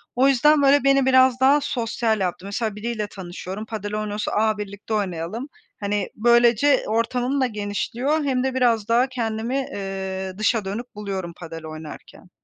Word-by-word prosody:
O 260 +2 +4
yüzden 285 +3 +4
böyle 280 0 +5
beni 275 -1 +4
biraz 260 -1 +5
daha 275 +3 +5
sosyal 230 -4 -1
yaptı. 185 0 -2
Mesela 205 +1 -2
biriyle 215 0 -3
tanışıyorum, 190 +2 -7
Padel 210 -2 -5
oynuyorsa, 210 0 -3
"A, 215 0 +2
birlikte 205 +1 -6
oynayalım," 200 - -3 0.3
hani, 205 -1 -1
böylece 240 +4 +4
ortamım 245 +5 0
da - - +4
genişliyor 235 +8 -2
hem 260 -2 0
de 265 -1 -1
biraz 235 -5 +2
daha 240 +3 +3
kendimi, 235 -1 -3
eee, 190 -6 -4
dışa 215 0 +1
dönük 220 +5 -5
buluyorum 195 -4 -4
Padel 165 -2 -8
oynarken. 155 +3 -10
220 Hz, 155 wpm, -23 LUFS, 200-255 Hz, 0.3 s, böyle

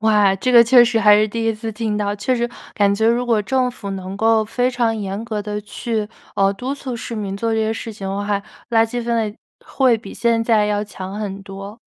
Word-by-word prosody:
哇， 210 -3 +4
这 255 - -1
个 235 -1 +8
确 245 +1 +7
实 235 -1 +1
还 210 -1 +7
是 215 +1 +2
第 230 +2 -3
1 225 - +2
次 225 +1 -5
听 215 -1 -2
到， 205 -1 -1
确 210 +6 0
实 240 0 -1 0.3
感 200 -1 +3
觉 220 +2 +1
如 240 +2 +2
果 230 -3 +2
政 255 +3 +1
府 205 -4 -8
能 190 0 -5
够 225 +1 +3
非 245 +3 0
常 235 -2 0
严 200 +1 -4
格 215 -3 -3
地 210 0 -4
去， 215 0 -3 0.3
呃， 195 0 +3
督 255 +7 -4
促 260 -3 -6
市 230 - -6
民 200 -3 -4
做 225 +2 -1
这 220 - +1
些 220 0 +1
事 225 0 -6
情 195 -2 -6
的 195 - -3
话， 205 0 -1 0.3
垃 225 -1 +4
圾 240 +2 -4
分 235 0 0
类 215 -2 -2 0.3
会 255 -4 +2
比 235 - -10
现 230 -1 +1
在 225 -2 +3
要 205 0 0
强 195 -2 -7
很 200 -2 -5
多。 195 +2 -9
220 Hz, 255 characters per minute, -20 LUFS, 205-235 Hz, 0.3 s, 个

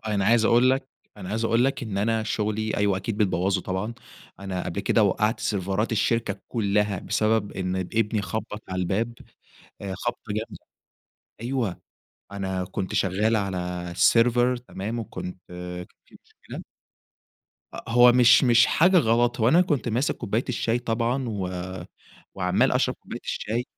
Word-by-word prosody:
أنا 100 -3 0
عايز 115 +1 +4
أقول 120 +3 +5
لك 135 0 -1 0.3
أنا 95 -3 -8
عايز 110 +2 -2
أقول 115 +2 +3
لك 135 - -1
إن 105 -4 -3
أنا 110 +2 +1
شغلي 110 0 -2
أيوه 100 -2 +2
أكيد 100 +3 -4
بتبوّظه 95 -2 +1
طبعًا. 95 +6 -3 0.5
أنا 95 -2 -4
قبل 100 - -3
كده 110 - +2
وقَّعت 105 +3 +1
سيرفرات 100 +3 -1
الشركة 110 -1 0
كُلّها 105 -3 0
بسبب 110 -1 0
إن 95 -1 -3
ابني 105 +3 -1
خُبّط 110 0 -5
على 95 0 -3
الباب 105 +6 -1 0.7
أ 95 -1 -4
خبطة 120 -1 -5
جامدة 110 +2 -6 0.8
أيوه. 120 -6 -2 0.5
أنا 95 -2 -3
كنت 95 +1 -5
شغّال 105 +4 +1
على 100 -3 -1 0.3
السيرفر 120 +8 +3
تمام 115 -1 -5
وكنت 95 -4 -6
كان 90 0 -7 0.2
في - - -18 0.2
مشكلة - - -9 1.1
أ - - -5
هو 120 +1 +7
مش 125 +2 +6
مش 120 -2 +6
حاجة 180 +3 +4
غلط، 120 -2 +2
هو 115 - +4
أنا 165 +6 +5
كنت 150 -8 -1
ماسك 120 +5 0
كوباية 110 +5 -2
الشاي 120 -1 0
طبعًا 120 +2 -1
و 100 -4 -3 0.9
وعَمّال - - +1
أشرب - - +1
كوباية - - -9
الشاي، 115 +3 -2
110 Hz, 150 wpm, -25 LUFS, 100-120 Hz, 1.1 s, هو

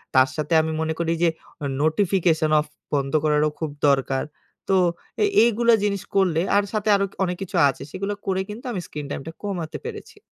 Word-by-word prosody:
তার 130 0 +6
সাথে 155 +2 -2
আমি 160 0 -2
মনে 160 0 0
করি 165 -1 +1
যে 170 - +5 0.3
ও 145 - -3 0.2
নোটিফিকেশন 160 -2 +2
অফ 150 - -1 0.3
বন্ধ 135 -1 0
করারও 150 0 +3
খুব 160 - -2 0.2
দরকার 135 -1 +2 0.5
তো 195 - +4 0.5
এ - - +5 0.2
এইগুলো 235 0 +3
জিনিস 200 -2 0
করলে, 180 -4 +3
আর 205 - +4
সাথে 215 0 0
আরো 200 0 +2 0.2
অনেক 180 -1 -1
কিছু 195 - -5
আছে 135 - -5
সেগুলো 195 +2 -3
করে 190 -1 0
কিন্তু 225 +5 -8
আমি 195 - -3
স্ক্রিন 150 -1 -6
টাইমটা 155 +4 -5
কমাতে 175 -6 -4
পেরেছি। 425 -2 -8
170 Hz, 185 wpm, -23 LUFS, 155-200 Hz, 0.5 s, তার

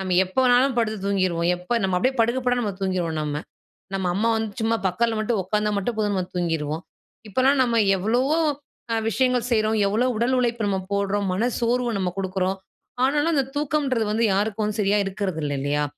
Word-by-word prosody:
நம்ம 185 -2 0
எப்ப 185 - -14
வேணாலும் 250 +1 +4
படுத்து 220 -2 0
தூங்கிருவோம். 185 -4 +1
எப்ப 205 +7 -1
நம்ம 185 -1 +1
அப்படியே 260 +8 0
படுக்க 235 +3 +2
படுக்க 245 -1 +1
நம்ம 205 -3 -2
தூங்கிருவோம் 175 -4 -1
நம்ம. 150 0 -3 0.5
நம்ம 190 -1 -1
அம்மா 225 +3 +1
வந்து 220 -1 -3
சும்மா 225 +1 +1
பக்கத்துல 225 +5 0
மட்டும் 215 0 0
உட்காந்தா 210 +2 0
மட்டும் 210 +4 -2
போதும் 210 -1 0
நம்ம 185 -2 -1
தூங்கிருவோம். 165 -2 -2 0.5
இப்பல்லாம் 260 +6 +3
நம்ம 235 -2 +1 0.2
எவ்வளவோ 245 - +1 0.7
விஷயங்கள் 250 +2 +1
செய்றோம். 220 -1 +2
எவ்வளவு 245 +5 +1
உடல் 240 +3 +1
உழைப்பு 235 -3 0
நம்ம 195 -1 0
போடுறோம். 200 0 0
மன 225 +7 +1
சோர்வை 240 +1 +1
நம்ம 185 -2 -1
குடுக்குறோம். 190 0 -1 0.5
ஆனாலும் 295 +5 +2
அந்த 275 - +3
தூக்கம்ன்றது 285 -5 0
வந்து 225 +2 +1
யாருக்கும் 210 +1 -1
சரியா 205 0 +2
இருக்றது 190 -3 -3
இல்ல 145 - -1
இல்லையா. 145 +1 0
215 Hz, 175 wpm, -23 LUFS, 190-240 Hz, 0.7 s, வேணாலும்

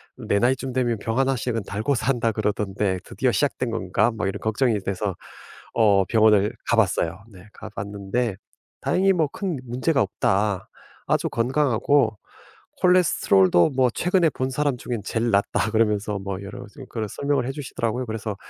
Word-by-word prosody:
내 100 - -1
나이쯤 130 +2 0
되면 120 -4 0
병 115 +3 -3
1 135 0 +2
씩은 115 -3 -2
달고 110 +8 -1
산다 115 -1 0
그러던데 105 -3 -1
드디어 130 -3 -1
시작된 130 -4 0
건가?' 110 +1 +1
막 100 -3 -2
이런 95 - -3
걱정이 110 0 +1
돼서 95 0 -3 0.6
어 100 -4 +4
병원을 110 -1 +4 0.2
가봤어요. 100 -5 +1
네 95 +1 -15
가봤는데 100 +1 -4 0.5
다행히 195 +1 +2
뭐 165 -3 +2
"큰 185 0 -3
문제가 130 +3 0
없다. 100 0 0 0.4
아주 - - +1
건강하고 130 -1 +2 0.7
콜레스테롤도 155 - +4
뭐 130 -1 +4
최근에 180 -2 +2
본 130 0 -2
사람 145 -2 0
중에 120 0 -4
제일 115 +1 -1
낫다." 100 +1 +1
그러면서 105 -2 +1
뭐 95 0 -5
여러 110 +6 -8
가지 105 - -15
그런 110 -2 -3
설명을 140 0 -1
해 135 - -1
주시더라고요. 125 -3 -3
그래서 110 -1 -4
115 Hz, 340 characters per minute, -23 LUFS, 100-130 Hz, 0.7 s, 어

